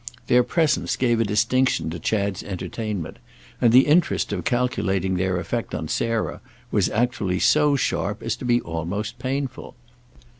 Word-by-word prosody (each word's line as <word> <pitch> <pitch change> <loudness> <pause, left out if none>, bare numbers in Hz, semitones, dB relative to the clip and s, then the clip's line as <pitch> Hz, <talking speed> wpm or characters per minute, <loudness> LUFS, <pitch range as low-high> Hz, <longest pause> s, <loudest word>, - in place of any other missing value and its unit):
Their 125 - +5
presence 155 +4 +1
gave 120 -3 +1
a - - +4
distinction 110 -4 +1
to 85 - -5
Chad's 100 +2 -1
entertainment, 95 -1 -5 0.4
and 115 - +5
the 130 +3 +7
interest 155 -7 +2
of 90 -4 -3
calculating 95 -5 0
their 95 0 0
effect 110 +7 -3
on 80 -1 -4
Sarah 115 -1 -1 0.3
was - - +2
actually 110 -5 0
so 150 +4 +4
sharp 110 -6 -1
as 115 -1 -1
to 125 - -7
be 120 0 +3
almost 100 +8 -4
painful. 130 +1 -4
115 Hz, 150 wpm, -23 LUFS, 95-125 Hz, 0.4 s, the